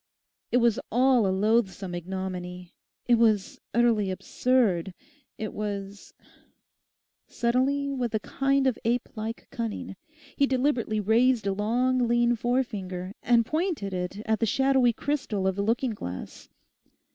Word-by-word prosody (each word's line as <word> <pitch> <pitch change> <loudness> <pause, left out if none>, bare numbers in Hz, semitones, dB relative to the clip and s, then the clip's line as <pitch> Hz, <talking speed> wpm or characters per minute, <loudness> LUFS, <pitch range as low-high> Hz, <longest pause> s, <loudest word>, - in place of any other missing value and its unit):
It - - +4
was 235 -1 +3
all 250 -2 +4
a - - +1
loathsome 195 -1 +1
ignominy. 180 0 -5 0.3
It 240 -2 +4
was 215 -4 +2
utterly 230 -4 +2
absurd. 190 -3 0 0.4
It 215 -1 -5
was— 200 -1 -5 1.2
Suddenly, 260 +4 0
with 245 -4 -2
a - - +2
kind 275 +4 0
of 260 -4 +1
ape 235 +2 0
like 220 +2 -5
cunning, 225 -4 -4 0.4
he 280 - +3
deliberately 255 -5 0
raised 225 +2 +3
a 195 - +1
long 245 +5 +1
lean 240 0 +3
forefinger 210 -7 -2
and 235 -1 +3
pointed 310 - -2
it 180 +3 -4
at 220 -1 +1
the 225 - +1
shadowy 265 0 +3
crystal 230 -6 -2
of 190 -1 +1
the 200 - -1
looking 235 +4 0
glass. 90 - -8
225 Hz, 135 wpm, -27 LUFS, 195-250 Hz, 1.2 s, It